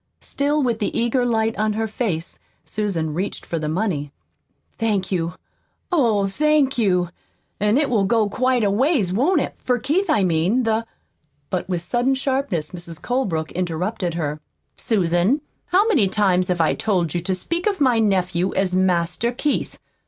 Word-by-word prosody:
Still 290 +1 0
with 235 -3 0
the 210 - -1
eager 240 +2 +1
light 225 -1 +1
on 215 0 +1
her 220 +1 -1
face, 200 -7 -3 0.3
Susan 180 -7 -2
reached 185 +6 -3
for 165 - -3
the 155 -1 -2
money. 160 -5 -1 0.7
"Thank 210 -5 0
you, 170 -2 -1 0.6
oh, 230 - +3
thank 290 +6 +2
you! 180 -5 +2 0.5
An' 210 +3 +2
it 290 -1 +2
will 220 -6 +2
go 220 +1 +2
quite 255 +2 +1
a 200 - +2
ways, 230 - +2
won't 285 - +2
it? - - -3
for 250 -1 0
Keith, 315 - 0
I 215 -9 +3
mean. 180 +8 +2
The 225 0 0 0.3
" 145 -2 -45
But 185 0 -2
with 175 -2 -1
sudden 245 +6 +1
sharpness 265 - -1
Mrs. 170 -2 -7
Colebrook 190 -12 -1
interrupted 180 +1 -2
her. 150 -2 -2 0.4
"Susan, 195 - +2 0.3
how 385 +5 +3
many 270 - +3
times 185 -2 +2
have 180 -2 +1
I 160 - +3
told 185 -8 0
you 175 - -1
to 185 +2 -1
speak 340 - -2
of 400 -4 0
my 255 -5 +3
nephew 185 -3 +1
as 190 -1 +1
'Master 185 +4 +1
Keith'? 285 +4 -2
205 Hz, 170 wpm, -22 LUFS, 180-250 Hz, 0.7 s, oh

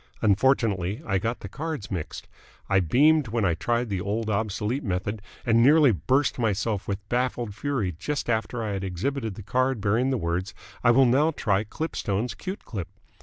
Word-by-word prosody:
Unfortunately 105 -3 +2
I 95 - +1
got 115 +4 -3
the - - -6
cards 150 0 -5
mixed. 85 -5 -5 0.4
I 95 -1 +3
beamed 145 - +4
when 110 -1 0
I 90 - +3
tried 120 +8 -1
the 95 -3 -2
old, 110 +3 -2
obsolete 110 +5 -1
method 100 +1 -2 0.2
and 115 0 +4
nearly 145 +1 +6
burst 130 +8 +1
myself 110 -2 0
with 100 0 -4
baffled 120 -3 -1
fury 115 -4 -1
just 145 - -3
after 115 0 -1
I 105 - -2
had 100 -1 -3
exhibited 110 +4 -2
the 105 - -9
card 130 +3 +1
bearing 110 +6 +1
the 130 - +1
words 90 +1 -2 0.3
'I 120 - +5
will 130 +3 +6
now 135 +6 +4
try 105 -10 0
Klipstone's 115 -5 -2
Kute 190 +1 -7
Klip.' 95 -7 -5
110 Hz, 175 wpm, -26 LUFS, 100-130 Hz, 0.4 s, nearly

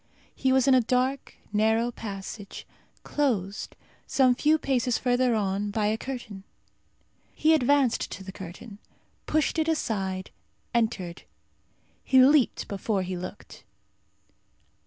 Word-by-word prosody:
He 265 - 0
was 260 0 +3
in 270 - +6
a 255 - +6
dark 255 +3 -1 0.2
narrow 220 +3 +2
passage, 200 -2 -7 0.4
closed, 215 -9 -2 0.3
some 260 -2 +4
few 305 +5 +3
paces 255 -5 0
further 245 -1 +2
on, 200 0 -1
by 210 +1 -1
a 215 +1 +2
curtain. 235 -7 -7 0.9
He 315 +1 +4
advanced 280 -3 +2
to 195 - -8
the 190 - -8
curtain, 195 +3 -10 0.5
pushed 310 +1 +1
it 315 - +1
aside, 195 -12 -2 0.4
entered. 215 -7 -1 0.8
He 260 - +4
leaped 270 0 +4
before 200 0 -1
he 185 0 -4
looked. 185 +3 -9
235 Hz, 120 wpm, -27 LUFS, 200-265 Hz, 0.9 s, in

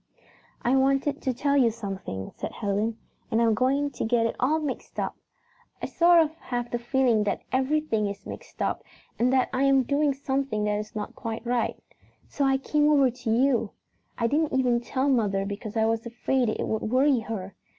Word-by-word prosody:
"I 245 +2 +3
wanted 275 +2 +2
to 260 - 0
tell 280 +3 0
you 255 -4 +5
something," 195 - -6
said - - -5
Helen, 210 +2 -1 0.3
"and 225 -1 +1
I - - +4
am 225 - +3
going 275 +5 +1
to - - -4
get 230 0 +2
it 230 - -1
all 290 +5 +2
mixed 295 -4 -5
up. - - -2 0.6
I - - -3
sort 345 0 +5
of 310 0 -4
have 240 -1 -4
the 240 - -1
feeling 240 -3 +2
that 200 - -2
everything 260 -5 +1
is 200 0 -7
mixed - - -7
up - - -2 0.4
and 245 +2 +3
that 260 -1 +2
I 260 - 0
am 275 -1 +4
doing 280 +1 +1
something 270 -5 -1
that 210 0 0
is 215 +1 -8
not 210 -1 -4
quite 225 +1 -5
right. 240 -1 0 0.5
So 280 - -1
I 270 0 +3
came 295 +2 +2
over 280 -4 +4
to 245 -1 -6
you. 250 +1 +2 0.4
I 230 - 0
didn't 290 +3 +1
even 245 -2 +2
tell 260 +3 -1
mother 205 -7 +1
because 205 +2 -5
I 220 - +3
was 225 0 0
afraid 240 +1 0
it - - -2
would 220 - -1
worry 260 +3 +3
her. 215 -4 -6
245 Hz, 200 wpm, -26 LUFS, 220-275 Hz, 0.6 s, you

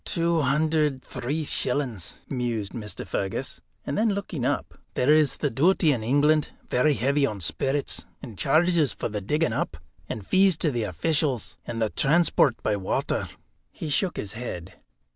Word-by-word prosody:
"Two 170 -1 +1
hundred 150 0 +1
three 140 +5 -3
shillings," 125 -9 -1
mused 120 -6 -2
Mr. 105 -5 -6
Fergus; 95 -1 -3 0.2
and 140 - -2
then 215 -2 +2
looking 180 -9 -4
up, - - -2 0.2
"there 130 +4 +4
is 155 -3 +4
the 145 - -1
duty 160 +5 +4
in 125 -5 0
England, 145 +5 +3 0.2
very 145 +4 +3
heavy 140 +4 +1
on 105 -7 0
spirits, 135 - -1 0.2
and 120 -6 -9
charges 160 - +3
for - - -3
the 105 -1 -3
digging 150 - 0
up, 80 - -2 0.3
and 105 -3 -5
fees 190 - +4
to 160 -2 +1
the 120 -4 -1
officials, 140 - 0
and 115 - -4
the 110 -2 0
transport 150 -4 +3
by - - +1
water 95 -2 -1 0.2
" - - -44
He 155 - -6
shook 180 +5 0
his 100 0 -4
head. 95 -7 -6
140 Hz, 165 wpm, -26 LUFS, 115-155 Hz, 0.3 s, there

